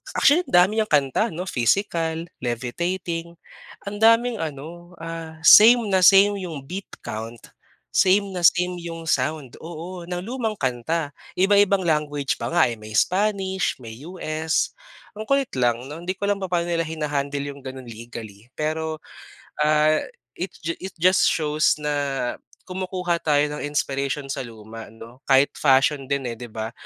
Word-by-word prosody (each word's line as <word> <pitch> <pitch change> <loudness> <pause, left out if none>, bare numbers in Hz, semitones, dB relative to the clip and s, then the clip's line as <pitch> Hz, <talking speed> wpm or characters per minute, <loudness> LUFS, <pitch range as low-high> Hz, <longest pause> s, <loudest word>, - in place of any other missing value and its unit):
actually 335 +6 +4
dami 185 +5 +4
niyang 215 - +1
kanta 145 - +2
no, 180 - -3
Physical, 165 - 0
Levitating. 170 +8 -3 0.5
Ang 205 +1 -6
daming 230 +1 +4
ano, 165 +3 -7
ah, 165 -1 -7
same 230 +6 +9
na 190 - +4
same 200 +2 +6
yung 150 -5 -7
beat 185 +8 -7 0.2
count, 115 +2 -6 0.5
same 200 +1 +3
na 185 - -4
same 180 +1 +3
yung 165 -1 -7
sound, 135 0 -1
oo, 170 +2 -8
ng 180 0 -3
lumang 230 -1 -3
kanta, 145 - -2 0.2
iba-ibang 200 +1 +4
language 150 -3 0
pa - - -3
nga, 170 -6 +4
eh, 115 - -6
may 110 0 -10
Spanish, 190 - +1
may 115 +1 -9
US 160 -3 -1 0.4
ang 215 - -5
kulit 275 +2 +1
lang, 120 0 0
'no, 160 +4 -8
hindi 185 - -2
ko 200 +2 -3
alam 200 -1 0
papaano 175 -2 -1
nila 170 -1 0
hina-handle 145 -3 -3
yung 140 - -15
ganun 130 -1 -8
legally 115 -1 -10
pero, 155 +2 -3 0.6
ah, 155 0 +3 0.3
it 185 +2 -5
ju 165 - 0
it 190 - -6
just 185 +2 +5
shows 155 -1 +2
na 150 -1 -2 0.7
kumukuha 180 -2 -2
tayo 145 -1 +2
ng - - -6
inspiration 140 -1 -2
sa - - -4
luma 115 -1 -10
'no. 115 +3 -13
Kahit 135 +1 +4
fashion 135 0 +3
din, 140 -1 -1
eh, 120 -2 -4
'di 120 - -7
ba 110 +1 -5
160 Hz, 155 wpm, -23 LUFS, 135-185 Hz, 0.7 s, same